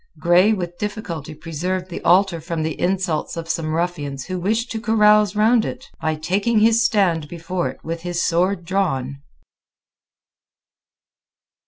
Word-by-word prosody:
Grey 180 +4 +4
with 175 -4 -3
difficulty 170 -8 -5
preserved 180 +4 -4
the - - -5
altar 180 -1 +3
from 165 -1 -3
the 160 -1 -4
insults 180 -4 -1
of 165 0 -5
some 165 -1 -2
ruffians 150 -6 -3
who 185 -1 -4
wished 220 +6 -1
to 225 - -4
carouse 210 -2 +4
round 220 +2 +4
it, 255 +4 -7
by 155 0 0
taking 195 +9 0
his 225 +2 +4
stand 185 -10 +2
before 170 -1 -3
it 130 - -10
with 165 +1 -4
his 175 0 -3
sword 175 +1 +1
drawn. 140 -8 -1
180 Hz, 145 wpm, -21 LUFS, 165-205 Hz, -, Grey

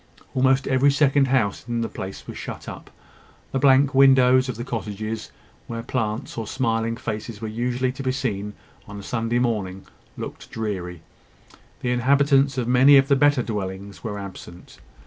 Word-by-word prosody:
Almost 130 +1 +2
every 135 +1 +3
second 140 -1 +3
house 125 -6 +1
in 120 -1 -1
the 115 - -1
place 95 -2 -7
was - - -8
shut - - -7
up. - - -9 0.6
The 135 - 0
blank 135 +1 +4
windows 130 -1 +5
of 125 - -3
the 120 - -5
cottages, 110 -2 -5 0.4
where 115 -1 -5
plants 115 -1 -3
or 110 - -5
smiling 115 -2 -1
faces 110 -2 -5
were 110 - -5
usually 125 +3 -1
to 130 - -8
be 130 -1 0
seen 105 -6 -3 0.3
on 105 0 -8
a - - -10
Sunday 115 +2 -1
morning, 105 -6 -2 0.3
looked - - -8
dreary. 90 -6 -5 0.8
The 125 - -1
inhabitants 135 +2 +3
of 120 -2 -1
many 130 +3 +7
of 135 +1 +3
the 140 - +5
better 145 -2 +3
dwellings 100 -2 -5
were 105 -3 -4
absent. 95 -3 -10
120 Hz, 165 wpm, -23 LUFS, 105-130 Hz, 0.8 s, many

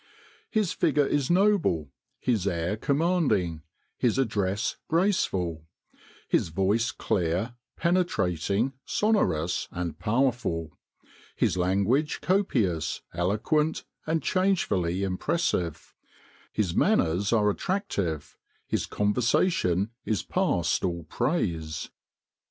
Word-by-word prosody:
"His 215 -6 +1
figure 150 -4 +2
is 140 -1 0
noble, 175 - +2 0.3
his 110 -6 0
air 85 +1 0
commanding, 140 - +1 0.4
his 120 -1 +2
address 105 -5 0
graceful; 95 - 0 0.6
his - - +1
voice 100 +7 +1
clear, 90 +6 -1 0.2
penetrating, 115 - +1
sonorous, 90 - +1
and 85 -3 -4
powerful; 105 - 0 0.6
his - - +1
language 100 - +1
copious, 110 - 0
eloquent, 110 - 0 0.2
and 160 -2 0
changefully 100 - +1
impressive; 95 - -1 0.6
his 100 -6 0
manners 90 +5 +2
are 105 -3 +4
attractive; 100 - -3 0.3
his - - -1
conversation 105 - +1
is 105 -6 -1
past 85 -1 0
all 85 -2 -1
praise. 80 - -2
105 Hz, 90 wpm, -27 LUFS, -, 0.6 s, are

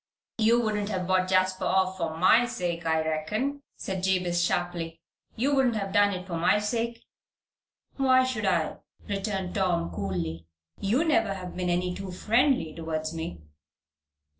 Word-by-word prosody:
"You 230 +2 +4
wouldn't 210 -3 -1
have 185 -3 -2
bought 185 0 +2
Jasper 185 0 +2
off 190 0 +2
for 160 -2 -2
my 225 +8 +5
sake, 175 -7 -3
I 160 0 +1
reckon," 215 - -2 0.2
said 190 -1 -4
Jabez, 180 -2 +1
sharply. 175 -2 -2 0.4
"You 270 +6 +1
wouldn't 260 -4 +3
have 195 -2 -3
done 205 0 +5
it 180 -1 -5
for 175 -3 -4
my 175 +5 +3
sake?" 230 +2 -2 0.9
"Why 260 -1 +5
should 250 -5 -2
I?" 170 -4 +1 0.3
returned 195 -2 -2
Tom, 175 -4 0
coolly. 85 -4 -4 0.3
"You 230 +10 +2
never 225 -11 +2
have 180 -2 -7
been 180 -1 -1
any 180 +1 0
too 195 0 -6
friendly 230 - +2
towards 160 -1 -3
me." 160 - -5
185 Hz, 155 wpm, -27 LUFS, 170-220 Hz, 0.9 s, my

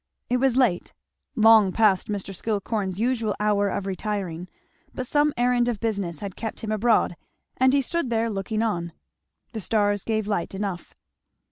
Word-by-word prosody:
It 250 - +3
was 260 -1 +2
late, 230 -10 +1 0.4
long 220 -4 +6
past 205 -3 +3
Mr. 200 -2 -4
Skillcorn's 200 -1 -2
usual 230 -3 0
hour 205 -1 +2
of 195 - -3
retiring, 190 -3 -4 0.5
but 255 - -3
some 295 +3 +2
errand 245 0 +2
of 235 -4 -1
business 200 -8 -2
had 200 -3 -6
kept 225 -2 -5
him 220 - -4
abroad 215 -4 +2 0.4
and 260 0 +4
he 275 0 +2
stood 335 -1 -1
there 230 0 +1
looking 215 +2 -2
on. 170 -7 -2 0.6
The 225 - -5
stars 205 -1 +1
gave 220 -2 -1
light 200 -3 -2
enough. 190 -3 -5
215 Hz, 160 wpm, -25 LUFS, 195-235 Hz, 0.6 s, long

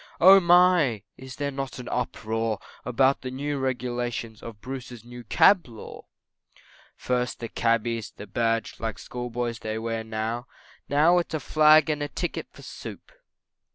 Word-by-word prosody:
Oh 190 +3 +9
my, 175 - +4
is 130 0 -10
there 140 0 -2
not 135 -1 -5
an 125 - -8
uproar 110 -2 -2 0.3
About 130 +3 +2
the 130 - -5
new 140 +2 -3
regulations 120 -3 -3
of 115 -3 -9
Bruce's 125 -1 -8
New 120 0 -10
Cab 175 - +4
Law, 115 -3 -11 0.9
First 125 -1 -2
the 115 - -4
Cabby's, 115 -1 0
the 105 - -11
badge, 115 +2 -1
like 110 -2 -4
schoolboys 120 -1 -4
they 110 0 -4
wear 115 0 -3
now, 110 +2 -4 0.4
Now 160 +5 +4
it's 170 -2 -3
a - - -1
Flag 155 0 +5
and 150 -1 -3
a 145 - -1
Ticket 175 +3 -4
for - - -15
Soup! - - -9
125 Hz, 155 wpm, -26 LUFS, 115-145 Hz, 0.9 s, Oh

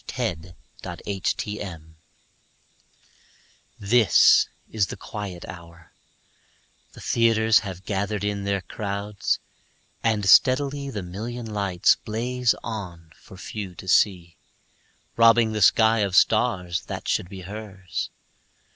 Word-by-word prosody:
Sara 90 - -2 0.6
Teasdale 100 -1 -3
Broadway - - -14 2.0
THIS 110 +2 +5 0.2
is 105 -3 +1
the - - -7
quiet 100 -5 -7
hour; 85 -1 -12 1.0
the - - -13
theaters 115 0 +3
Have 95 -3 -8
gathered 100 0 -2
in 100 -1 -2
their 100 -1 -1
crowds, 100 +1 -3 0.6
and 110 -3 0
steadily 140 +5 +4
The 105 -7 -5
million 115 +7 -6
lights 100 -5 +2
blaze 120 +2 -1
on 90 -8 -7
for 95 - -15
few 95 -1 -7
to 95 - -11
see, 90 -3 +2 0.8
Robbing 115 -1 +5
the 105 -1 -3
sky 110 +3 +5
of 100 -3 0
stars 90 -3 +2
that - - -6
should 90 - -1
be 95 -2 -9
hers. 95 -2 -6
100 Hz, 110 wpm, -24 LUFS, 95-110 Hz, 2.0 s, THIS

